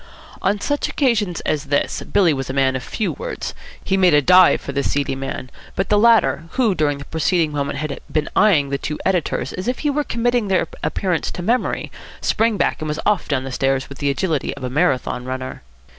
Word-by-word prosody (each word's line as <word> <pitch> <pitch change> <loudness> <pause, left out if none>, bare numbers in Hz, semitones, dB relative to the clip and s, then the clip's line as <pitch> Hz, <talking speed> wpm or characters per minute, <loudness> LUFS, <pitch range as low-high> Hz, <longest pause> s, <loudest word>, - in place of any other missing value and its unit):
On 205 +1 +1
such 290 +7 -1
occasions 215 - 0
as 155 -1 -1
this 145 0 0
Billy 180 -6 +2
was 135 -1 -4
a - - -2
man 135 -1 +2
of 130 - -2
few 210 - -2
words. - - -5 0.3
He 195 - +1
made 180 -5 +5
a 145 - +5
dive 185 +3 +6
for - - -6
the 140 0 0
seedy 140 -1 -1
man; 135 -1 -5 0.2
but 195 - -1
the 210 - +4
latter, 210 - +4
who 240 -6 +2
during 150 -4 0
the 140 - -9
preceding 160 0 +1
moment 140 -1 -2
had 150 0 -4
been 155 -1 0
eyeing 165 -10 +4
the 140 0 -2
two 150 +2 -4
editors 180 -4 0
as 185 +4 -5
if 250 - 0
he 295 - +3
were 295 +1 0
committing 240 -3 0
their 190 -2 +1 0.2
appearance 180 -4 -1
to 175 - -6
memory, 240 +6 0 0.3
sprang 225 -1 +1
back, - - 0
and 155 - -3
was 150 +1 -3
off 210 -3 +1
down 135 -3 0
the 135 - -6
stairs 135 +1 0
with 140 - -10
the 145 - 0
agility 155 +1 -1
of 135 - -9
a 125 - -3
Marathon 135 -5 0
runner. 130 0 -5
160 Hz, 220 wpm, -20 LUFS, 140-205 Hz, 0.3 s, dive